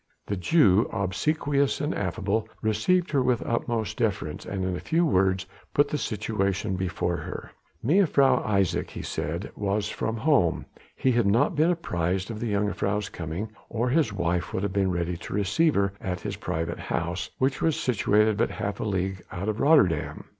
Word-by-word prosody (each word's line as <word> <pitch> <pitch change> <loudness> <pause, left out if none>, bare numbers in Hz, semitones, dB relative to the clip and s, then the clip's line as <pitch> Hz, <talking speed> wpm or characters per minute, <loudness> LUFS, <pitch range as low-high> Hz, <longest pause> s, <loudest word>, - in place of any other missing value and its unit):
The 100 - -2
Jew, 100 - +4
obsequious 140 +8 0
and 150 +3 -1
affable, 100 +3 -1
received 130 +13 +2
her 140 -3 +3
with 125 -2 +1
utmost 115 -3 -1
deference, - - -2
and 95 -2 -2
in 95 -1 -1
a - - -4
few 170 +2 +1
words 95 - +2 0.3
put 145 0 +4
the 150 - -1
situation 100 -2 -1
before 90 -2 -1
her. - - -7 0.3
Mevrouw 140 - +4
Isaje, 100 -4 +1
he - - -7
said, 85 +6 -3
was 105 +1 -1
from 110 +1 -2
home: 115 - +2 0.3
he 130 - +2
had 120 -4 +2
not 115 - +3
been 155 +3 +3
apprised 95 - -1
of 110 - -6
the 115 -2 -2
jongejuffrouw's 105 0 0
coming, 85 +7 -5 0.2
or 120 +2 -1
his 140 -4 +2
wife 90 -2 -1
would 95 - -1
have 100 -2 -1
been 100 -1 +2
ready 85 -1 -1
to 90 - -6
receive 105 - +2
her 100 0 +1
at 90 -2 -3
his - - -4
private 85 +1 -3
house, 85 +3 -3
which 130 +1 0
was 160 -2 +1
situated 105 -2 +2
but - - +2
half 100 0 -4
a - - -2
league 95 -3 -1
out 90 +4 -4
of 110 +1 -2
Rotterdam. 140 - +3
105 Hz, 175 wpm, -26 LUFS, 95-125 Hz, 0.3 s, Jew